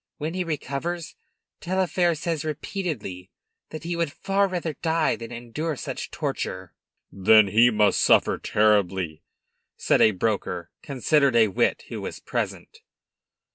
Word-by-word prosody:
When 155 +2 -4
he 185 0 -1
recovers, 165 +1 -4 0.4
Taillefer 180 -1 +1
says 160 -1 -3
repeatedly 150 - -5 0.4
that 155 - -8
he 170 +1 -3
would 170 -3 -1
far 195 +4 +1
rather 175 -4 -3
die 160 +1 0
than 115 0 -9
endure 120 +7 -4
such - - -5
torture." 95 -1 -4 0.4
"Then 105 +1 +5
he 115 +4 +5
must 105 -3 +2
suffer - - +4
terribly!" 95 -6 +1 0.6
said - - +2
a - - +7
broker, 95 -4 -2
considered 140 0 +2
a 110 -2 +5
wit, 95 - 0
who - - -5
was - - -6
present. - - -4
140 Hz, 135 wpm, -25 LUFS, 105-165 Hz, 0.6 s, a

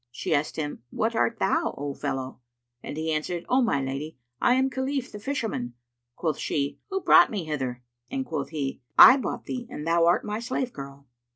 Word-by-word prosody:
She 120 - -3
asked 145 +1 0
him, 150 -5 -4
"What 225 - -1
art 230 0 +1
thou, 195 - +1
O 145 0 -3
fellow?" 130 -1 -4 0.4
and - - -7
he 160 0 -1
answered, 165 +3 -2
"O 260 +1 +3
my 225 - +2
lady, 135 +3 -5 0.2
I 245 - +4
am 260 +1 +3
Khalif 265 0 -2
the 210 - -8
Fisherman." 210 - -3 0.4
Quoth 160 -3 -2
she, 140 -1 -2
"Who 385 -1 -2
brought - - +7
me 205 -5 -3
hither?"; 130 -5 -3 0.3
and 265 0 -3
quoth 150 - -3
he, 140 -4 -4 0.2
"I 260 - +11
bought 265 - -4
thee, 245 -2 -5
and 150 -11 -6
thou 165 0 +3
art 175 - +3
my 210 +1 -3
slave 250 +1 -3
girl." 140 0 -9
165 Hz, 195 wpm, -26 LUFS, -, 0.4 s, I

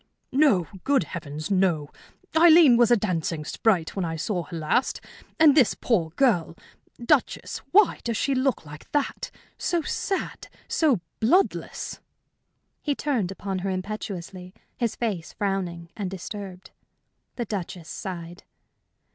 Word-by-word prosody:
"No! 260 - +4 0.2
Good 275 -2 +3
Heavens, 155 -1 -6
no! 175 -6 +1 0.4
Aileen 320 -5 +8
was 235 -1 +5
a 240 - +6
dancing 165 -6 -2
sprite 180 -3 +1
when 195 - -1
I 165 -1 -2
saw 175 +2 -2
her 170 - -7
last, 160 +11 0 0.4
and 310 -2 +8
this 270 -6 +4
poor 180 -10 +1
girl! 195 -12 +2 0.4
Duchess, 245 +3 +1
why 410 -1 +5
does 230 -2 -1
she 275 - +1
look 260 - 0
like 150 0 -12
that? 290 -1 -1 0.3
So 345 -2 0
sad, 390 +4 -3 0.2
so 280 - +2 0.2
bloodless!" 355 - +1 0.8
He 290 -2 -1
turned 250 -13 -1
upon 195 0 -4
her 195 +2 -2
impetuously, 185 -1 -5 0.2
his 235 -3 -1
face 200 -8 -3
frowning 180 -4 -3
and 200 -4 -3
disturbed. 190 0 -8 0.6
The 240 - -3
Duchess 180 -5 -5
sighed. 175 -2 -7
195 Hz, 130 wpm, -25 LUFS, 175-255 Hz, 0.8 s, Aileen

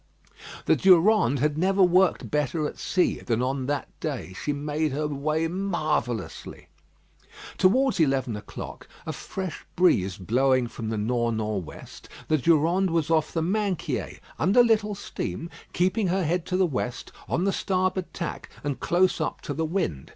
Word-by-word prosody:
The - - +4
Durande 185 - +4
had 150 +1 +1
never 190 +2 +3
worked 185 +1 +3
better 150 +1 0
at - - -9
sea 180 -1 +1
than 120 +1 -1
on 130 0 -2
that 145 0 -1
day. 95 - -4
She 150 - 0
made 150 +1 -1
her 150 +2 -1
way 155 +3 -1
marvellously. 155 - -3 0.9
Towards 250 +6 +3
eleven 135 -6 +1
o'clock, 105 - -8 0.2
a - - -3
fresh 185 -4 -6
breeze 100 - +3
blowing 130 +6 +2
from 115 -1 -6
the 110 - -2
nor' 120 +2 0
nor' 110 -3 -2
west, 80 - -12 0.2
the 155 -1 +3
Durande 170 +6 +3
was 165 -1 0
off 155 -2 +2
the 165 - -1
Minquiers, 195 -1 -2 0.2
under 200 +9 +5
little 215 -3 +2
steam, 170 -3 -5 0.2
keeping 190 +3 +1
her 185 +1 +1
head 170 +1 -1
to 185 - 0
the 190 - +4
west, 125 -6 -4 0.2
on 170 - 0
the 195 0 +1
starboard 185 -1 -1
tack, 170 - -5
and 145 -2 -2
close 180 0 +2
up 155 - -2
to 145 - -4
the 160 +3 -1
wind. 155 - -2
160 Hz, 160 wpm, -26 LUFS, 135-185 Hz, 0.9 s, under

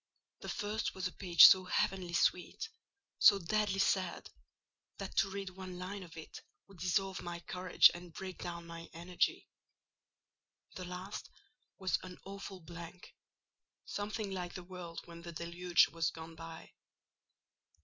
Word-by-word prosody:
The - - -7
first 210 +2 -2
was 190 0 -3
a - - -7
page 175 -3 +6
so 185 -1 +10
heavenly 180 -1 0
sweet—so 210 - +2
deadly 200 +2 0
sad—that 190 +1 -3
to 195 - +4
read 195 -1 -5
one 185 -1 -8
line 190 +2 -5
of 165 -3 -11
it 160 - -9 0.3
would 195 -3 -16
dissolve 190 +2 0
my 175 0 -5
courage 180 +1 +5
and 175 0 -9
break 185 +2 -7
down 170 -1 -5
my 170 0 -9
energy. 175 +2 -1 1.3
The 185 - -6
last 180 +3 -6 0.5
was 190 -1 +1
an 185 -1 -9
awful 195 -1 -7
blank: 170 +2 -10 0.7
something 205 0 -3
like 180 -2 -4
the 180 - -6
world 175 -2 -7
when 170 0 -11
the 170 0 -7
deluge 170 0 +2
was 165 +1 0
gone 160 0 -9
by. 165 0 -10
180 Hz, 140 wpm, -34 LUFS, 170-195 Hz, 1.3 s, so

